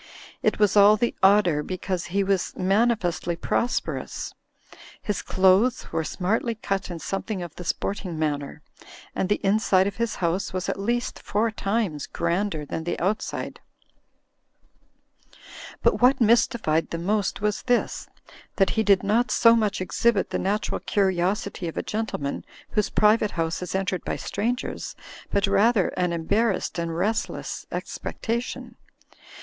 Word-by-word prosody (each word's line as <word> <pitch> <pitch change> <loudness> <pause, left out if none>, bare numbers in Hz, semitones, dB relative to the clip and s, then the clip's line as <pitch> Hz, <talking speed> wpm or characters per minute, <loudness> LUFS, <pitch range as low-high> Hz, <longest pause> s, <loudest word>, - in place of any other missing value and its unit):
It - - +1
was 210 -1 +3
all 205 +1 +7
the 235 +2 0
odder 190 -6 +5
because 185 +1 -3
he 195 +3 0
was 195 -1 0
manifestly 195 -3 +1
pros 235 +7 0
perous; - - -6 0.7
his 210 -3 -2
clothes 190 +7 +3
were 160 - 0
smartly 220 +8 -1
cut 195 -3 -3
in 175 - -5
something 195 +2 -3
of 170 -3 -8
the 180 - -8
sporting 185 0 -3
manner, 145 -2 -2 0.5
and 190 - -1
the 205 - +2
inside 195 -2 +3
of 200 - -3
his 235 0 -1
house 180 +3 -1
was 185 -1 -2
at - - -2
least 240 +4 -1
four 220 +2 0
times 200 -8 -2
grander 170 -2 -1
than 160 - -4
the 175 - -3
outside. 195 +5 -2 2.2
But - - +3
what 260 +2 +5
mystified 225 -8 +2
them 170 +1 -4
most 205 -1 0
was 210 0 -1
this, 245 -1 0 0.5
that 195 - +3
he 220 - +1
did 200 -3 +4
not 220 +3 +2
so 230 +1 +6
much 210 -3 0
exhibit 205 +2 +1
the - - -1
natural 205 +3 -1
curiosity 190 0 0
of 165 - -6
a - - -1
gentle 220 0 -3
man 140 -1 -3 0.3
whose 210 -2 +1
private 210 0 +3
house 165 +1 -1
is 180 +1 -4
entered 190 -2 -1
by - - -2
strangers, 235 +5 -3 0.3
but 200 - +2
rather 200 +1 +3
an 180 -1 -1
embarrassed 190 +3 0
and 165 -1 -2
restless 215 +5 -2
expectation. 235 +2 -4
195 Hz, 145 wpm, -25 LUFS, 180-215 Hz, 2.2 s, all